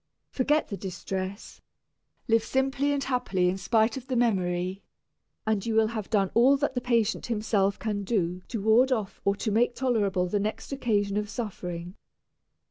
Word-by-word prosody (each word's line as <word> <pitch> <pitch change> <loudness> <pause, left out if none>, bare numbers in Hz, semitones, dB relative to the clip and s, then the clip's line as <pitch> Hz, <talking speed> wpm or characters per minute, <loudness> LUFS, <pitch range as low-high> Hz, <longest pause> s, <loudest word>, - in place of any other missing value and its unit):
Forget 295 +4 +1
the 200 - -4
distress; 190 +1 -5 0.7
live 225 -1 +3
simply 270 +3 0
and 280 -1 0
happily 245 -9 +1
in 190 +2 -2
spite 220 +5 +2
of 260 -1 -8
the 260 - -2
memory, 185 -5 0 0.6
and 215 -3 0
you 225 -1 -1
will 220 -1 +4
have 220 -3 -5
done 195 -4 +1
all 260 +4 +5
that 280 -1 -1
the 250 - -2
patient 230 -3 +1
himself 210 -3 +1
can 210 -2 -2
do 185 -4 -1
to 225 -4 -4
ward 235 +5 +5
off 215 -6 -2
or 200 0 +3
to 215 +1 -2
make 240 +3 +2
tolerable 205 -8 +1
the 205 +3 0
next 215 +6 -3
occasion 210 -7 0
of 210 0 -2
suffering. 180 -6 -5
220 Hz, 170 wpm, -27 LUFS, 195-245 Hz, 0.7 s, all